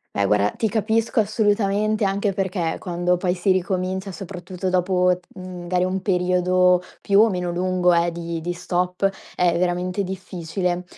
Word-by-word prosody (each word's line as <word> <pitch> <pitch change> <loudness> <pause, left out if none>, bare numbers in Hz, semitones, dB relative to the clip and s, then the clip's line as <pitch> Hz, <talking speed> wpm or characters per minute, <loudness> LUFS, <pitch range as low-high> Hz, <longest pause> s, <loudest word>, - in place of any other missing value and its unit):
Beh, 100 -1 +2
guarda 105 0 +2
ti 220 - -1
capisco 220 +1 +1
assolutamente, 210 0 +1
anche 195 +1 0
perché 185 -3 -1
quando 175 0 0
poi 180 0 0
si 185 +1 +1
ricomincia 185 +1 -1
soprattutto 185 +1 -5
dopo, 180 0 +2
mhmm, 185 -1 -8
magari 180 +1 0
un 185 0 -2
periodo 180 -1 +3 0.2
più 200 0 +3
o 225 -2 +4
meno 180 -1 -2
lungo 180 0 +1
eh, 170 0 +2
di 170 -1 -4
di 175 +2 -3
stop, 180 +2 0 0.3
è 175 -1 +2
veramente 180 +2 0
difficile. 180 -1 -3
180 Hz, 155 wpm, -22 LUFS, 175-195 Hz, 0.3 s, o